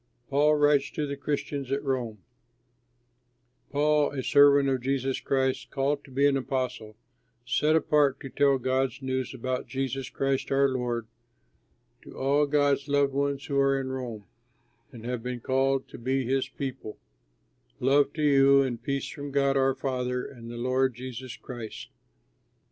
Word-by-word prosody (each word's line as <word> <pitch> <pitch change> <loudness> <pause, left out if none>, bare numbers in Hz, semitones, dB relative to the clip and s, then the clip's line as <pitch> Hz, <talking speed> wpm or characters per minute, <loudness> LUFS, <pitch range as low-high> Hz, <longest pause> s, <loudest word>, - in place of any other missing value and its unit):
PAUL 150 +2 +4
WRITES 145 -1 +3
TO 150 - -3
THE 140 0 -4
CHRISTIANS 140 -1 -3
AT 140 +1 -1
ROME 125 -6 -2 1.5
Paul, 150 0 +2
a 135 -2 -3
servant 140 0 +5
of 130 -2 0
Jesus 135 0 -1
Christ, 130 -1 -1
called 140 +1 -1
to - - -15
be 135 +2 +1
an 140 -1 +4
apostle, 125 -5 -3 0.5
set 155 +5 +2
apart 145 -3 +2
to 135 - -7
tell 140 +1 +3
God's 130 +1 0
good 135 - -11
news 130 -1 -2
about 130 +1 -3
Jesus 135 -1 -3
Christ 135 -1 -1
our 140 0 +4
Lord, 120 -3 -2 1.0
to - - -13
all 145 +2 +2
God's 140 -1 +2
loved 140 -1 +2
ones 140 0 -1
who 140 -1 0
are 135 0 +3
in 130 -1 -4
Rome 120 -5 -5 0.7
and 115 -2 -11
have 125 -1 -3
been 125 +1 -4
called 135 +2 0
to - - -10
be 130 +2 -1
his 135 +2 0
people: 130 -5 -6 0.8
Love 140 +3 +3
to 155 - -3
you, 140 -1 +5
and 120 -3 -3
peace 140 +2 -2
from 145 -1 -7
God 140 0 +2
our 135 -1 +2
Father 125 -1 -2
and 115 -3 -10
the 120 - -7
Lord 130 +1 +1
Jesus 130 0 -7
Christ. 120 -4 -8
135 Hz, 160 wpm, -27 LUFS, 130-140 Hz, 1.5 s, servant